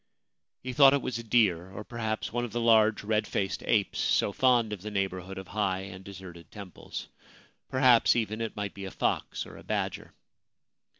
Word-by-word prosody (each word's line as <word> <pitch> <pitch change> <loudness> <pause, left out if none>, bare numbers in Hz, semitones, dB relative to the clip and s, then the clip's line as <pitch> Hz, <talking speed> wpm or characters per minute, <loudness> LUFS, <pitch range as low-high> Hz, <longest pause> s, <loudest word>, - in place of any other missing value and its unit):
He 130 0 -4
thought 140 0 +7
it 140 - -1
was 115 -2 -3
a - - -6
deer, 105 -7 +2
or 95 +3 -8
perhaps 110 -1 -4
one 120 0 -1
of 120 - -4
the 120 - -2
large 110 -2 +4
red 105 0 0
faced 95 -1 -2
apes 105 -4 +1
so 100 - +2
fond 120 -4 +3
of 100 - -6
the 105 - -5
neighbourhood 95 -2 -3
of 95 -1 -8
high 95 -3 -1
and 95 -1 -9
deserted 95 -3 -11
temples; 100 -4 -8 0.6
perhaps, 130 -3 +5
even, 110 -1 -1
it 115 - -4
might 100 -1 -4
be 100 -1 -7
a - - -5
fox - - -2
or - - -12
a - - -13
badger. - - -3
105 Hz, 190 wpm, -28 LUFS, 95-115 Hz, 0.6 s, thought